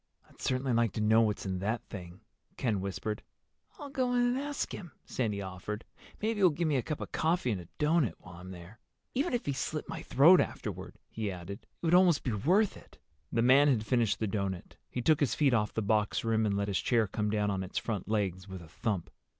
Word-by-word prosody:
"I'd - - -19
certainly 130 0 0
like 115 -4 +2
to - - -3
know 110 +1 +5
what's 105 -2 0
in 95 -1 -2
that 110 +5 -1
thing," 90 -2 -9 0.4
Ken 110 -7 0
whispered. 100 +2 -3 0.6
"I'll 290 -5 -8
go 255 -2 0
in 245 - +3
and 245 +1 +2
ask 290 0 -3
him," 175 -7 -8
Sandy 105 -5 -2
offered. 95 +4 -6 0.3
"Maybe 220 0 -1
he'll 190 -2 +6
give 165 +2 -1
me 150 - +1
a - - +1
cup 150 +4 -4
of - - -6
coffee 160 -5 +1
and 95 -4 -2
a 85 - -13
doughnut 150 - +2
while 90 -1 -13
I'm 90 +1 -10
there. 90 +4 -11 0.3
Even 275 +1 0
if 240 - -3
he 140 - 0
slit 155 +3 -3
my 160 0 -5
throat 160 +6 +6
afterward," - - -5
he 110 -2 -3
added, 95 +2 -6
"it - - -32 0.2
would 165 - +2
almost 180 -3 +5
be 125 - -1
worth 180 - +2
it." - - -17 0.3
The 115 - +2
man 135 +4 +6
had 115 -6 +2
finished 115 -4 +2
the 110 - -1
doughnut. 95 -3 -3
He 125 - -4
took 155 +1 +4
his 145 - +1
feet 140 -4 +3
off 105 -2 +2
the 110 - -2
box 105 0 +1
rim 110 -1 +2
and 100 -1 0
let 100 0 0
his 100 -2 0
chair 115 -3 +2
come 105 +1 -2
down 105 -1 +1
on 95 -1 -1
its 95 - -5
front 105 -6 -2
legs 100 -3 -1
with 95 -2 -8
a - - -13
thump. 105 -2 -3
110 Hz, 230 wpm, -31 LUFS, 100-150 Hz, 0.6 s, he'll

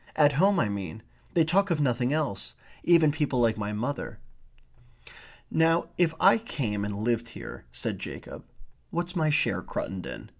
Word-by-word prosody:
At 145 -2 +5
home, 190 +5 +4
I 110 - +2
mean. 100 0 -5 0.3
They 165 -2 +5
talk 195 +5 +2
of 170 -3 +1
nothing 125 -2 +1
else. 110 - -2 0.3
Even 165 -3 +5
people 145 -4 0
like 115 -2 +3
my 105 -1 -3
mother." 120 +7 -3 1.3
"Now 165 +1 +3
if 165 -2 +2
I - - +6
came 110 - -3
and 105 0 -3
lived 120 0 0
here - - -9
" - - -31
said - - -2
Jacob. - - -8 0.5
"What's 175 +2 -3
my 160 -3 +2
share, 150 - +2
Cruttendon? 95 -2 -5
145 Hz, 160 wpm, -28 LUFS, 110-165 Hz, 1.3 s, I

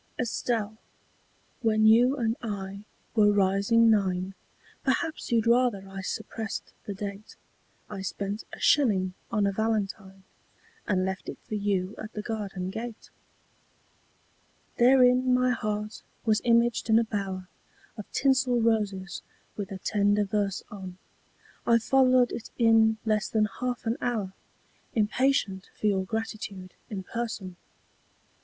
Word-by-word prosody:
] - - -38
ESTELLE, 225 -3 -1 0.8
when 215 -2 +3
you 240 +5 +6
and 225 -3 0
I 200 -2 -5 0.3
were 210 -2 +5
rising 205 +4 +4
nine 190 -2 +1 0.5
Perhaps 320 -5 -1
you'd 230 -1 +3
rather 235 -5 +2
I 195 0 -7
suppressed 220 +3 -5
the 200 - -4
date 200 +1 -7 0.5
I 205 -2 -6
spent 200 +2 -4
a - - -9
shilling 195 -10 +3 0.2
on 210 -3 +1
a 200 - +2
valentine 195 -2 -2 0.6
And 185 -2 +1
left 190 0 -4
it - - -6
for - - -6
you 200 -2 0
at 215 +1 -7
the 210 - -5
garden 195 -5 -4
gate. 230 +2 -7 1.7
Therein 250 0 +5
my 250 0 +3
heart 210 -2 -3 0.2
was 215 -1 +3
imaged 235 -1 +2
in 220 - +6
a 230 - +4
bower 195 -4 -4 0.5
Of 210 - -9
tinsel 265 -3 +2
roses, 205 -4 0 0.3
with 200 -1 -5
a 195 - -4
tender 205 +1 +2
verse 200 -1 -1
on; 190 -3 -8 0.7
I 235 - +6
followed 255 +1 +4
it 230 - -6
in 225 -2 +5
less 215 -2 +1
than 215 -1 +2
half 250 -1 -2
an 225 +2 0
hour 215 -6 -1 0.6
Impatient 215 -3 +1
for - - -4
your 195 -2 +2
gratitude 205 -3 -5 0.2
in 195 -3 -5
person. 215 -4 -5
215 Hz, 135 wpm, -27 LUFS, 195-235 Hz, 1.7 s, you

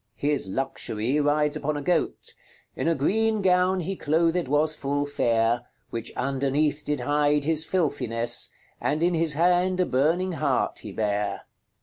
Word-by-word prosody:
His 145 -8 -1
Luxury 125 +2 -2
rides 150 +1 +2
upon 150 0 -2
a - - -4
goat: 175 +4 -1 0.4
"In - - -2
a 165 - +2
greene 215 +8 +1
gowne 185 0 +3
he 195 +3 -3
clothed 165 +1 +1
was 150 +3 +2
full 145 -1 -2
faire, 120 -3 0 0.2
Which 115 -1 -4
underneath 140 +3 0
did 150 -3 -2
hide 145 +2 +1
his 155 +1 +2
filthinesse, 125 -10 +1 0.3
And 155 +3 0
in 175 +1 +2
his 165 -2 +2
hand 180 +3 +2
a 180 - +3
burning 165 +8 +1
hart 145 -6 -1
he 105 - -8
bare." 105 -1 -2
150 Hz, 150 wpm, -25 LUFS, 135-170 Hz, 0.4 s, gowne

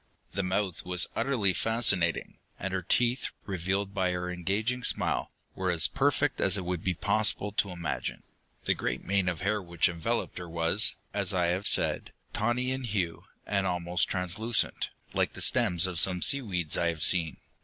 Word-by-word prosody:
The 100 - -1
mouth 95 -1 -2
was 90 -2 +2
utterly 110 -9 +1
fascinating, 110 -6 +1 0.2
and 95 0 -4
her 95 - -1
teeth, 120 +8 +1 0.2
revealed 95 +1 -2
by 95 -2 0
her 90 0 -3
engaging 105 +8 -2
smile, - - +1 0.2
were 95 -1 -2
as 85 -2 +5
perfect 145 +1 0
as 95 0 +4
it 95 - -5
would 90 -2 -3
be 90 -1 -1
possible 105 +2 +1
to 100 0 0
imagine. 85 -2 -4 0.4
The - - +3
great - - -3
mane 100 -2 +1
of 85 -1 -5
hair 105 +2 0
which 85 -2 +1
enveloped 85 +1 -3
her 90 -1 -8
was, 85 +6 +1 0.2
as 100 -1 0
I 90 -1 +1
have 95 +3 -2
said, - - +2 0.2
tawny 120 +4 0
in 130 -1 -3
hue, 95 -7 -3 0.2
and 100 -2 0
almost 90 0 +1
translucent, 95 +5 0 0.2
like - - 0
the - - -9
stems 95 -8 +4
of 90 -3 +1
some 90 -1 +3
seaweeds 95 - +1
I 85 - +1
have 80 -2 -2
seen. 85 -4 +4
95 Hz, 175 wpm, -28 LUFS, 90-105 Hz, 0.4 s, as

